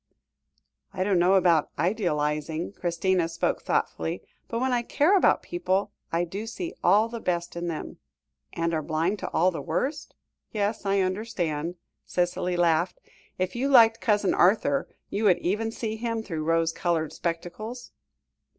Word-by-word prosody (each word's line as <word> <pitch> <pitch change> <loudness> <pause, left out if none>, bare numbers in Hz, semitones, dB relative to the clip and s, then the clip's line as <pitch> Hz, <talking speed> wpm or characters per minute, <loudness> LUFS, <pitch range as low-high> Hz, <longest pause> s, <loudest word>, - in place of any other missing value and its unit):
"I 185 - 0
don't 190 -2 +2
know 180 +3 +4
about 170 -5 +4
idealising," 160 -2 -1
Christina 175 -1 0
spoke 165 - -1
thoughtfully, 80 +4 -1 0.2
"but, 230 - -3
when 260 0 +1
I 240 - +2
care 295 +10 +3
about 380 - +4
people, 205 - -1 0.2
I 170 +1 +1
do 195 +6 -5
see 340 +9 -5
all 215 +2 +5
the 230 0 -6
best 175 -4 -2
in 170 0 -3
them 165 -2 -5 0.3
" 65 -1 -51
"And 170 0 -1
are 160 - 0
blind 165 +6 -1
to - - -4
all 180 +3 +3
the 165 - -5
worst? 290 +3 -3 0.4
Yes, 210 -1 -1
I 195 0 +3
understand," 180 -5 -2 0.3
Cicely 180 0 -1
laughed, 170 0 +2 0.4
"if 185 +3 -2
you 265 +4 0
liked 230 -4 +6
Cousin 210 -3 +2
Arthur, 275 +9 +3 0.2
you 215 +2 -1
would 185 -4 +5
even 210 +6 -1
see 220 -1 -4
him 230 -1 -2
through 160 -6 -4
rose 165 0 +2
coloured 165 -3 -1
spectacles?" 180 +8 -5
185 Hz, 160 wpm, -26 LUFS, 170-220 Hz, 0.4 s, liked